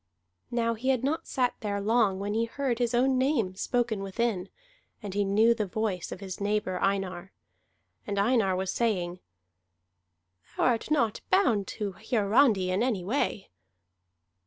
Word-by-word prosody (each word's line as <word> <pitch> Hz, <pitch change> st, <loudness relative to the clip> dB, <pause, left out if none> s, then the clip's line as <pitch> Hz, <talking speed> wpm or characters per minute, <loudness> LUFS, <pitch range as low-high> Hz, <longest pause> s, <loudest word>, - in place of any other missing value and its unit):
Now 230 Hz, -1 st, 0 dB
he 240 Hz, +4 st, -3 dB
had 260 Hz, -2 st, +2 dB
not 295 Hz, +4 st, -1 dB
sat 250 Hz, -2 st, 0 dB
there 205 Hz, -1 st, -2 dB
long 210 Hz, -2 st, +2 dB
when 205 Hz, +1 st, -2 dB
he 225 Hz, +1 st, +1 dB
heard 250 Hz, 0 st, -2 dB
his 240 Hz, -1 st, +1 dB
own 260 Hz, +1 st, +3 dB
name 255 Hz, -8 st, +1 dB
spoken 230 Hz, +1 st, -1 dB
within, 195 Hz, -1 st, -2 dB, 0.5 s
and 200 Hz, -2 st, -5 dB
he 205 Hz, +1 st, +1 dB
knew 215 Hz, +4 st, +4 dB
the 215 Hz, -3 st, -2 dB
voice 195 Hz, -2 st, -2 dB
of 185 Hz, -, -7 dB
his 190 Hz, 0 st, -7 dB
neighbor 205 Hz, -3 st, -1 dB
Einar. 195 Hz, -1 st, -1 dB, 0.7 s
And 200 Hz, -1 st, -2 dB
Einar 200 Hz, -2 st, +2 dB
was 190 Hz, 0 st, -2 dB
saying, 180 Hz, -6 st, -1 dB, 1.4 s
"Thou -, -, +1 dB
art 235 Hz, +1 st, +1 dB
not 240 Hz, -8 st, +1 dB
bound 245 Hz, -, +3 dB
to 205 Hz, -2 st, -2 dB
Hiarandi 210 Hz, -1 st, +2 dB
in 185 Hz, +3 st, +1 dB
any 230 Hz, -7 st, 0 dB
way." 210 Hz, -1 st, -2 dB
215 Hz, 155 wpm, -28 LUFS, 195-240 Hz, 1.4 s, knew